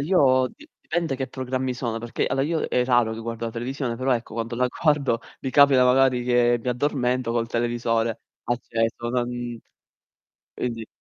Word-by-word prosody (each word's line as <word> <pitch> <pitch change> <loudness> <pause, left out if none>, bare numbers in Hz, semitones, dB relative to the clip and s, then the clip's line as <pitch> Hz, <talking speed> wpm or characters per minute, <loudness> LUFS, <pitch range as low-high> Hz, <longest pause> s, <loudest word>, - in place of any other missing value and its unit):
io 135 -6 +3
di 305 - -17
dipende 165 -5 -2
che 130 0 -2
programmi 130 0 -2
sono, 120 -2 -3
perché 120 0 -2
allora 135 0 0
io 160 +1 0
è 125 - +1
raro 120 -3 +3
che 110 - -6
guardo 115 0 -5
la 115 - -2
televisione, 120 +1 -3
però, 130 +2 +1
ecco, 115 -2 -3
quando 115 +1 -3
la 125 +1 +2
guardo 140 -3 +1 0.2
mi 135 - -3
capita, 140 -2 +6
magari, 125 -1 +4
che 120 -1 +3
mi 125 - -4
addormento 125 -2 0
col 115 -1 0
televisore 115 -1 0 0.2
acceso, 120 -1 -2
non 120 -1 -2 1.0
quindi 115 -3 -4
125 Hz, 170 wpm, -24 LUFS, 115-130 Hz, 1.0 s, capita